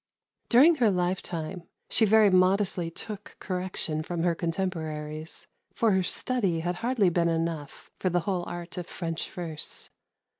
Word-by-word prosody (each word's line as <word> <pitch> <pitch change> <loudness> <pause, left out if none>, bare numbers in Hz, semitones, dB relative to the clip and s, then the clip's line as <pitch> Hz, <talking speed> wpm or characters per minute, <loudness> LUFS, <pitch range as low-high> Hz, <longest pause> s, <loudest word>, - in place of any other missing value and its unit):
During 300 +7 +7
her 235 -5 +4
lifetime 175 -2 -2 0.2
she 225 - +4
very 215 -1 +6
modestly 185 -1 +3
took 205 +4 -8
correction 180 -4 -1
from 165 +1 -3
her 175 -1 +3
contemporaries, 160 -3 -4 0.3
for 225 -2 +3
her 190 -1 +3
study 190 -4 0
had 175 +1 -2
hardly 230 -4 +2
been 170 0 +2
enough 165 -3 -3
for 185 - +1
the 175 0 +1
whole 180 0 -1
art 175 +1 -6
of 175 - -6
French 165 -2 -4
verse. 165 -4 -5
180 Hz, 145 wpm, -28 LUFS, 165-195 Hz, 0.3 s, During